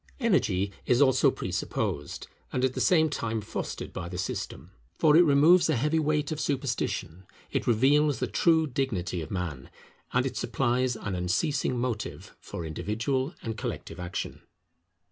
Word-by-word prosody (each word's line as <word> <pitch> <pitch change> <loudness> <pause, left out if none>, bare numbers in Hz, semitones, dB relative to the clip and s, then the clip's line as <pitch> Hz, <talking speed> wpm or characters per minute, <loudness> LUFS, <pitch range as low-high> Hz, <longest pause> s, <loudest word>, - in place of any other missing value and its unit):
Energy 100 - +1 0.2
is 125 - +4
also 135 -2 +5
presupposed, 70 - -3 0.3
and 130 0 +1
at 130 - 0
the - - -2
same 160 -3 +4
time 115 -6 -2
fostered, 105 +1 -5
by 85 - -5
the 90 - -6
system. 95 - -4 0.3
For 150 -2 +5
it 170 - +8
removes 160 +3 +5
a 155 - +3
heavy 150 +6 +1
weight 150 0 0
of 155 - -3
superstition, 120 - -2 0.2
it - - -1
reveals 140 +4 +4
the - - -1
true 160 -2 +3
dignity 120 - -2
of 80 - -7
man, 85 -8 -4 0.4
and - - +2
it - - -3
supplies 125 +1 0
an 100 -3 -4
unceasing 125 - 0
motive 120 -3 -4
for 85 - -7
individual 115 - -2
and 110 -1 -3
collective 110 - -5
action. 90 0 -5
125 Hz, 155 wpm, -28 LUFS, 100-150 Hz, 0.4 s, it